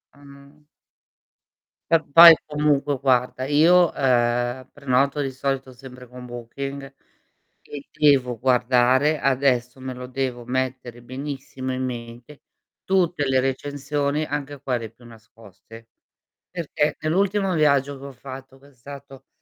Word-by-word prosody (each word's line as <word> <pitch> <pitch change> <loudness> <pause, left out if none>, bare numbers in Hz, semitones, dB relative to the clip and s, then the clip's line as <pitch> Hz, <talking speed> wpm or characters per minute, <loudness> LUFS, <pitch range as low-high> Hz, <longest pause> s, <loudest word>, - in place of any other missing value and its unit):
Mh. 140 +1 -18 1.3
Va 165 -1 +4
poi 165 +3 +9
comunque 150 -2 0
guarda, 130 -1 0
io, 165 +5 +4
ehm, 120 0 0
prenoto 140 +1 0
di 135 -1 -3
solito 135 0 -3
sempre 125 0 -13
con 125 0 -11
Booking 135 +3 -7 0.7
e 145 -1 -10
devo 140 -6 +2
guardare, 125 +4 +2
adesso 130 -2 0
me 130 0 -6
lo 125 0 -9
devo 130 -2 -4
mettere 130 -1 -4
benissimo 130 0 -6
in 130 0 -3
mente, 120 +3 -9 0.4
tutte 180 -5 0
le 130 -1 +2
recensioni 145 +2 -2
anche 145 -1 -5
quelle 120 -5 -3
più 115 +2 -21
nascoste. 115 -1 -16 0.6
Perché 155 -3 -2
nell'ultimo 195 +4 0
viaggio 140 -3 +1
che 135 - -11
ho - - -9
fatto, 135 0 -11
cos'è 140 0 -21
stato, 135 +1 -12
135 Hz, 120 wpm, -22 LUFS, 125-145 Hz, 1.3 s, poi